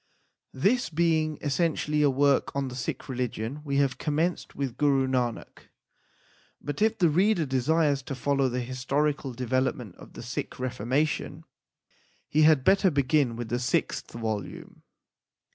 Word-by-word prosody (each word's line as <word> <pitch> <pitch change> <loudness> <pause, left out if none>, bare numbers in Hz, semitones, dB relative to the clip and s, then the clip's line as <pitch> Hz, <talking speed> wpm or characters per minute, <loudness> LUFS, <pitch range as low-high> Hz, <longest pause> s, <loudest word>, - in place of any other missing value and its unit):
This 205 - +1
being 160 -2 +1
essentially 150 0 0
a 145 - +5
work 140 +1 +2
on 140 -1 -1
the 125 - -8
Sikh 125 - -4
religion 125 +1 -3
we 140 -2 -1
have 140 -2 +1
commenced 160 +4 -1
with 135 -4 -3
Guru 140 -2 +2
Nanak; 125 -3 -3 0.9
but 145 +6 -5
if 220 +1 +3
the 175 - +4
reader 180 +2 +2
desires 140 +2 +1
to 135 +1 -6
follow 135 +1 +1
the 125 +1 -2
historical 135 +3 -1
development 125 - -2
of - - -14
the - - -9
Sikh 125 +2 -5
reformation, 135 +5 -1 0.8
he 155 - +2
had 155 -3 +5
better 195 +4 +4
begin 140 -4 +1
with 120 -1 -6
the 120 - -1
sixth 125 - -1
volume. 110 -3 -5
140 Hz, 145 wpm, -27 LUFS, 125-155 Hz, 0.9 s, a